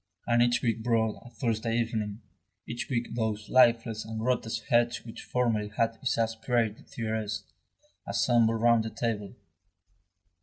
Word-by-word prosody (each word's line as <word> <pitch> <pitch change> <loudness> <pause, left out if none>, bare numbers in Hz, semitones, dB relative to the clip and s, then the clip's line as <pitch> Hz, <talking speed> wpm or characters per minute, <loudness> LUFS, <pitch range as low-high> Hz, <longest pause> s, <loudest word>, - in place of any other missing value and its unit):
And 120 0 +3
each 120 0 +3
week 115 -2 0
brought 110 -2 +1
a 120 - -12
Thursday 115 0 -1
evening, 110 -2 -2 0.4
each 120 +1 -5
week 120 -3 -2
those 110 -2 -2
lifeless 115 -3 +4
and 110 0 -6
grotesque 115 -1 -1
heads 120 0 +2
which 115 - -8
formerly 115 -4 0
had 115 -1 +2
exasperated 115 -2 0
Thérèse, 110 -2 -3 0.6
assembled 115 -1 +3
round 115 -1 +5
the 110 - -3
table. 110 -3 -3
115 Hz, 130 wpm, -29 LUFS, 110-120 Hz, 0.6 s, round